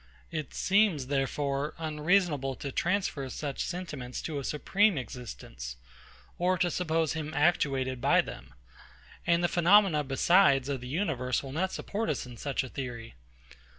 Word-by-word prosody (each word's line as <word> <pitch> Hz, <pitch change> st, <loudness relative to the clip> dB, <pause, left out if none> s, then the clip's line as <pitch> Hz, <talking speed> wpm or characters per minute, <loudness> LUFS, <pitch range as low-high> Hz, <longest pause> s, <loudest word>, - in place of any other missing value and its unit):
It 155 Hz, -4 st, -5 dB
seems, 195 Hz, -8 st, +3 dB
therefore, 140 Hz, +2 st, -1 dB
unreasonable 155 Hz, -3 st, +1 dB
to 140 Hz, -, -5 dB
transfer 170 Hz, -5 st, -1 dB
such 140 Hz, +1 st, -3 dB
sentiments 150 Hz, -9 st, -5 dB
to 155 Hz, -3 st, -3 dB
a -, -, -5 dB
supreme 190 Hz, +7 st, +2 dB
existence, 85 Hz, -, -7 dB, 0.6 s
or 180 Hz, +1 st, +2 dB
to 175 Hz, 0 st, +1 dB
suppose 165 Hz, -3 st, 0 dB
him 155 Hz, -1 st, -4 dB
actuated 135 Hz, -5 st, +1 dB
by -, -, +5 dB
them; 65 Hz, +1 st, -10 dB, 0.7 s
and 170 Hz, 0 st, +3 dB
the -, -, +4 dB
phenomena 175 Hz, -2 st, +4 dB
besides 140 Hz, 0 st, +4 dB
of 135 Hz, -3 st, -2 dB
the 125 Hz, -, -7 dB
universe 130 Hz, -6 st, -1 dB
will 135 Hz, -, -7 dB
not 185 Hz, +6 st, -1 dB
support 220 Hz, +2 st, -3 dB
us 145 Hz, -, -1 dB
in 125 Hz, -1 st, -10 dB
such 140 Hz, +4 st, -2 dB
a 130 Hz, -, -7 dB
theory. 120 Hz, -4 st, -6 dB
150 Hz, 150 wpm, -29 LUFS, 130-175 Hz, 0.7 s, by